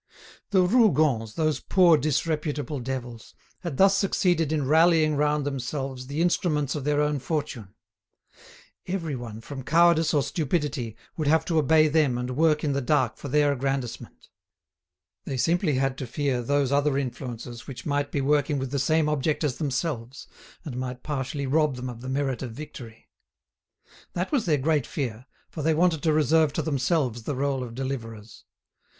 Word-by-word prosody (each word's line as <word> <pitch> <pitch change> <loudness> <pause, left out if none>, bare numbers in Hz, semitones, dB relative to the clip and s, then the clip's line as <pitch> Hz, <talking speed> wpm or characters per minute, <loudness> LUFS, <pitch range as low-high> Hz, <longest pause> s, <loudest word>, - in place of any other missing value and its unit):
The 190 -3 +4
Rougons, 155 - +3
those 155 -2 0
poor 180 -3 +5
disreputable 150 -1 -1
devils, 125 -2 -6 0.2
had 170 -7 -5
thus 195 0 +5
succeeded 180 -5 +1
in 150 -3 0
rallying 160 0 +4
round 150 0 +1
themselves 135 -1 -4
the 145 +4 -1
instruments 155 -5 +1
of 145 -3 -4
their 145 0 +1
own 150 -1 0
fortune. 135 - -4 1.1
Everyone, 135 - -4
from 135 +2 -7
cowardice 165 +3 +4
or 145 - +3
stupidity, 145 - -2 0.2
would 155 -3 -1
have 160 +1 +3
to 165 -2 +1
obey 155 +1 +4
them 150 -5 +2
and 125 +1 -3
work 155 0 +2
in 145 -2 +1
the 140 - 0
dark 130 -2 +1
for - - -7
their 145 +1 +3
aggrandisement. 135 -3 -4 1.0
They 135 - -3
simply 165 +2 +1
had 135 0 0
to 130 - -4
fear 135 0 -1
those 140 +2 +1
other 140 0 +2
influences 120 -3 -5
which 135 - -8
might 145 -1 -1
be 140 - -1
working 145 +1 +1
with 130 -1 -4
the 140 - -1
same 155 +3 +2
object 150 +1 0
as 140 -5 -1
themselves, 135 -4 -3 0.4
and 130 -6 -6
might 125 0 -5
partially 140 -1 -3
rob 150 0 +2
them 125 0 -5
of 120 -1 -11
the 130 - -6
merit 135 -1 -1
of 125 -4 -5
victory. 120 -5 -10 1.1
That 180 +2 -2
was 260 -10 0
their 155 -3 +3
great 145 -1 +1
fear, 125 -3 -4 0.2
for 155 - -5
they 160 +1 +2
wanted 165 -2 +2
to 160 - +2
reserve 155 0 +3
to - - -1
themselves 135 -4 0
the 140 +5 -4
role 135 -1 -1
of 115 -2 -8
deliverers. 115 -5 -6
145 Hz, 170 wpm, -26 LUFS, 130-155 Hz, 1.1 s, poor